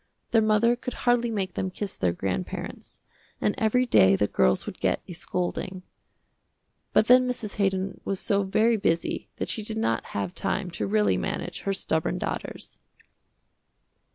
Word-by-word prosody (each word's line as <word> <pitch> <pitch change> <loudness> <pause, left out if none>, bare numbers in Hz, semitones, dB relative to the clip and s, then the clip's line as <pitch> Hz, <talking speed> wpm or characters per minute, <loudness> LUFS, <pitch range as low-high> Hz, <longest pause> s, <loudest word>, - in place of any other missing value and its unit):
Their 225 - +5
mother 215 +2 +3
could 245 0 -6
hardly 240 -1 +3
make 195 -5 -2
them 190 - -2
kiss 195 +1 -4
their 90 - +1
grandparents, 90 +2 -5 0.4
and 210 - +1
every 250 +2 +3
day 95 - +5
the 105 - +2
girls 65 -9 +2
would - - -7
get - - 0
a 180 - -7
scolding. 180 +2 -3 1.1
But - - +4
then 250 +2 +6
Mrs. 235 -4 -4
Haydon 195 -1 0
was 195 -1 -2
so 200 -1 +1
very 220 +4 +2
busy 165 -4 -1
that - - -3
she 220 - -2
did 220 +1 -4
not 115 - 0
have 95 -3 -2
time 185 -2 -2
to 105 -11 -3
really 100 -2 +2
manage - - -3
her 195 - -1
stubborn 160 -4 0
daughters. - - -5
195 Hz, 160 wpm, -26 LUFS, 160-220 Hz, 1.1 s, then